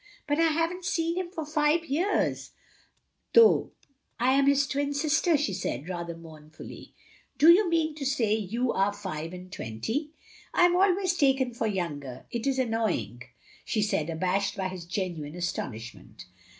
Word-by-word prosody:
" -, -, -31 dB
But 290 Hz, +1 st, 0 dB
I 330 Hz, -, +5 dB
have 330 Hz, +1 st, +1 dB
n't 360 Hz, 0 st, -9 dB
seen 335 Hz, -1 st, 0 dB
him 365 Hz, -1 st, -3 dB
for 325 Hz, -4 st, -5 dB
five 305 Hz, +2 st, +1 dB
years, 345 Hz, +8 st, -1 dB, 0.8 s
though 460 Hz, -1 st, +5 dB, 0.5 s
I 250 Hz, +2 st, +3 dB
am 275 Hz, 0 st, +3 dB
his 280 Hz, 0 st, +4 dB
twin 285 Hz, +1 st, -2 dB
sister," 310 Hz, +2 st, +2 dB
she 275 Hz, -9 st, -1 dB
said, 165 Hz, -5 st, -4 dB
rather 170 Hz, -2 st, -5 dB
mourn 155 Hz, -2 st, -13 dB
fully. 160 Hz, -, -12 dB, 0.2 s
" -, -, -33 dB
Do 320 Hz, +3 st, +8 dB
you 370 Hz, +1 st, +5 dB
mean 320 Hz, -2 st, +1 dB
to 300 Hz, -2 st, -7 dB
say 230 Hz, -6 st, +1 dB
you 225 Hz, +4 st, -1 dB
are 195 Hz, +1 st, +1 dB
five 180 Hz, -6 st, -5 dB
and 180 Hz, 0 st, -10 dB
twenty?" 220 Hz, -, -4 dB, 0.5 s
"I 350 Hz, -, +6 dB
am 355 Hz, 0 st, +3 dB
always 375 Hz, 0 st, +3 dB
taken 270 Hz, -6 st, +2 dB
for 230 Hz, -1 st, -2 dB
younger. 145 Hz, -, -4 dB
It 235 Hz, +2 st, -3 dB
is 270 Hz, -1 st, +1 dB
an 255 Hz, -3 st, 0 dB
noying," 220 Hz, -, -1 dB, 0.4 s
she 215 Hz, -, 0 dB
said, 170 Hz, -6 st, -1 dB
abashed 185 Hz, +5 st, -1 dB
by 190 Hz, -1 st, -2 dB
his 185 Hz, -2 st, -8 dB
genuine 170 Hz, -4 st, -4 dB
astonishment. 115 Hz, -, -6 dB
235 Hz, 175 wpm, -27 LUFS, -, 0.8 s, Do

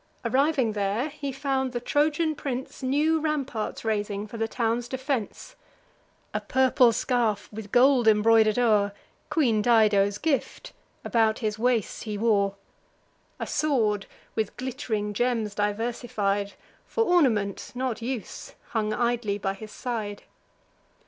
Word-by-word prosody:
Arriving 270 Hz, -3 st, +2 dB
there, 210 Hz, +6 st, -1 dB
he 285 Hz, -1 st, -5 dB
found 265 Hz, -1 st, -1 dB
the 240 Hz, -, -1 dB
Trojan 305 Hz, +5 st, +1 dB
prince 265 Hz, -3 st, -5 dB
New 295 Hz, +5 st, +2 dB
ramparts 280 Hz, -9 st, -3 dB
raising 205 Hz, -1 st, -1 dB
for 220 Hz, +2 st, -9 dB
the 225 Hz, 0 st, 0 dB
town's 235 Hz, +1 st, -1 dB
defence. 260 Hz, -4 st, -4 dB, 0.8 s
A -, -, -1 dB
purple 260 Hz, -2 st, +4 dB
scarf, 225 Hz, -3 st, 0 dB
with 210 Hz, -1 st, -8 dB
gold 250 Hz, -1 st, +5 dB
embroider'd 220 Hz, 0 st, +5 dB
o'er, 210 Hz, -4 st, +3 dB, 0.4 s
(Queen 235 Hz, -9 st, +2 dB
Dido's 210 Hz, -3 st, +4 dB
gift,) 315 Hz, -, -2 dB, 0.3 s
about 220 Hz, -2 st, +2 dB
his 215 Hz, -2 st, -3 dB
waist 240 Hz, -3 st, 0 dB
he 210 Hz, -2 st, -3 dB
wore; 200 Hz, -3 st, +2 dB, 0.8 s
A -, -, -2 dB
sword, 220 Hz, -9 st, 0 dB, 0.3 s
with 220 Hz, -3 st, -2 dB
glitt'ring 235 Hz, -5 st, -3 dB
gems 230 Hz, -2 st, 0 dB
diversified, 205 Hz, -1 st, -1 dB, 0.3 s
For 455 Hz, -, +1 dB
ornament, 250 Hz, -, +1 dB
not 250 Hz, -2 st, -2 dB
use, 240 Hz, -2 st, -5 dB
hung 215 Hz, -2 st, -1 dB
idly 235 Hz, -3 st, 0 dB
by 195 Hz, -1 st, -2 dB
his 215 Hz, +2 st, -10 dB
side. 215 Hz, -5 st, -4 dB
230 Hz, 125 wpm, -26 LUFS, 210-260 Hz, 0.8 s, gold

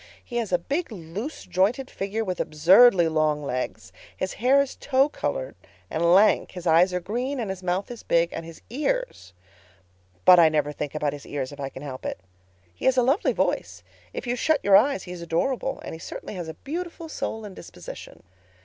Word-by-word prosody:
He 240 Hz, -, -5 dB
has 230 Hz, -5 st, -2 dB
a 180 Hz, -, +4 dB
big, 280 Hz, -, -3 dB
loose 200 Hz, -, -6 dB
jointed 220 Hz, +9 st, +1 dB
figure 200 Hz, +3 st, -3 dB
with 185 Hz, -2 st, -3 dB
absurdly 175 Hz, +4 st, +6 dB
long 155 Hz, -2 st, +1 dB
legs. 130 Hz, -2 st, -4 dB, 0.2 s
His 185 Hz, -, -3 dB
hair 260 Hz, +3 st, +5 dB
is 280 Hz, -1 st, 0 dB
tow 270 Hz, +1 st, +2 dB
color -, -, -3 dB, 0.4 s
and 160 Hz, -, -1 dB
lank, 210 Hz, +3 st, +4 dB
his 180 Hz, -1 st, -8 dB
eyes 170 Hz, +3 st, +5 dB
are 180 Hz, -, -1 dB
green, 245 Hz, +9 st, -3 dB
and 215 Hz, -5 st, -2 dB
his 190 Hz, -1 st, -7 dB
mouth 185 Hz, +4 st, -2 dB
is 240 Hz, -, -8 dB
big, 170 Hz, 0 st, +2 dB
and 165 Hz, -, -5 dB
his 165 Hz, 0 st, -12 dB
ears—but 95 Hz, -, -1 dB
I 165 Hz, -2 st, +7 dB
never 150 Hz, -1 st, 0 dB
think 150 Hz, 0 st, -5 dB
about 150 Hz, -2 st, 0 dB
his 145 Hz, -1 st, -9 dB
ears 135 Hz, -2 st, -4 dB
if 145 Hz, -, -11 dB
I 135 Hz, -1 st, -3 dB
can 135 Hz, -, -10 dB
help 130 Hz, -3 st, -7 dB
it. -, -, -4 dB, 0.5 s
"He -, -, -8 dB
has 260 Hz, 0 st, +4 dB
a 250 Hz, -, +5 dB
lovely 275 Hz, -, +2 dB
voice—if -, -, -4 dB
you 245 Hz, 0 st, -1 dB
shut 310 Hz, +5 st, +2 dB
your 200 Hz, -1 st, +6 dB
eyes 225 Hz, +1 st, +4 dB
he 180 Hz, -, -9 dB
is 180 Hz, -1 st, -7 dB
adorable—and 230 Hz, +11 st, -2 dB
he 160 Hz, -, -8 dB
certainly -, -, -7 dB
has 175 Hz, -4 st, -5 dB
a 160 Hz, -, -7 dB
beautiful 335 Hz, -, -6 dB
soul 225 Hz, -8 st, -4 dB
and 200 Hz, -2 st, -9 dB
disposition. 90 Hz, -, -10 dB
185 Hz, 195 wpm, -25 LUFS, 155-250 Hz, 0.5 s, I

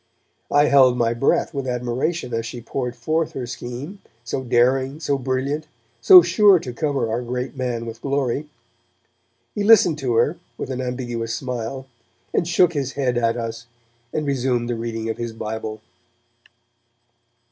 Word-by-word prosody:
I 145 Hz, +1 st, +4 dB
held 130 Hz, -4 st, +5 dB
my 115 Hz, -1 st, +2 dB
breath 120 Hz, +4 st, +1 dB
with 135 Hz, -2 st, -3 dB
admiration 125 Hz, +4 st, -2 dB
as 115 Hz, 0 st, -2 dB
she 120 Hz, -, -7 dB
poured 125 Hz, +1 st, -4 dB
forth 155 Hz, +7 st, -1 dB
her 130 Hz, -, -4 dB
scheme, 125 Hz, +10 st, -7 dB, 0.2 s
so 125 Hz, +2 st, -3 dB
daring, 130 Hz, +3 st, +2 dB
so 145 Hz, -3 st, 0 dB
brilliant, 135 Hz, +4 st, -2 dB, 0.3 s
so 365 Hz, -2 st, +9 dB
sure 205 Hz, -3 st, +5 dB
to 130 Hz, -7 st, -6 dB
cover 135 Hz, -1 st, -1 dB
our 115 Hz, +2 st, -1 dB
great 125 Hz, +3 st, -4 dB
man 125 Hz, -3 st, -3 dB
with 115 Hz, 0 st, -8 dB
glory. 140 Hz, +1 st, -1 dB, 1.0 s
He 205 Hz, -, -2 dB
listened 195 Hz, -8 st, +5 dB
to 125 Hz, -4 st, -1 dB
her 130 Hz, +9 st, +2 dB, 0.2 s
with -, -, -5 dB
an 130 Hz, 0 st, -3 dB
ambiguous 120 Hz, -3 st, -3 dB
smile, 125 Hz, 0 st, -4 dB, 0.5 s
and 170 Hz, -, +1 dB
shook 175 Hz, 0 st, +3 dB
his 135 Hz, -3 st, -2 dB
head 130 Hz, -3 st, 0 dB
at 115 Hz, 0 st, +1 dB
us, 115 Hz, 0 st, -5 dB, 0.4 s
and 155 Hz, -, -2 dB
resumed 125 Hz, -3 st, 0 dB
the -, -, -1 dB
reading 115 Hz, -1 st, -4 dB
of 110 Hz, 0 st, -3 dB
his 115 Hz, -1 st, -4 dB
Bible. 110 Hz, -1 st, -5 dB
125 Hz, 160 wpm, -22 LUFS, 120-140 Hz, 1.0 s, so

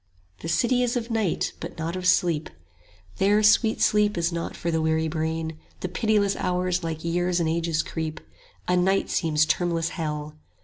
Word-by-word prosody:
70 -, -, -20 dB
The 165 Hz, -, -4 dB
City 245 Hz, +9 st, +2 dB
is 245 Hz, 0 st, 0 dB
of 235 Hz, 0 st, -4 dB
Night, 220 Hz, -6 st, 0 dB
but 170 Hz, -, -7 dB
not 165 Hz, +2 st, -3 dB
of 185 Hz, 0 st, -2 dB
Sleep; 165 Hz, -4 st, +2 dB, 0.7 s
There 205 Hz, +2 st, +3 dB
sweet 220 Hz, +1 st, +4 dB
sleep 210 Hz, -2 st, +3 dB
is 170 Hz, +1 st, +1 dB
not 170 Hz, 0 st, -4 dB
for 170 Hz, -, -2 dB
the 160 Hz, -1 st, +1 dB
weary 160 Hz, 0 st, +1 dB
brain; 160 Hz, 0 st, -3 dB, 0.2 s
The 185 Hz, -, -3 dB
pitiless 205 Hz, 0 st, +1 dB
hours 180 Hz, 0 st, 0 dB
like 160 Hz, -1 st, -4 dB
years 175 Hz, +1 st, +1 dB
and 165 Hz, -, +1 dB
ages 165 Hz, -1 st, 0 dB
creep, 160 Hz, -1 st, -4 dB, 0.5 s
A 180 Hz, -, +2 dB
night 190 Hz, +2 st, +2 dB
seems 155 Hz, -2 st, +2 dB
termless 165 Hz, +1 st, 0 dB
hell. 155 Hz, -2 st, -5 dB
170 Hz, 180 wpm, -25 LUFS, 160-195 Hz, 0.7 s, sweet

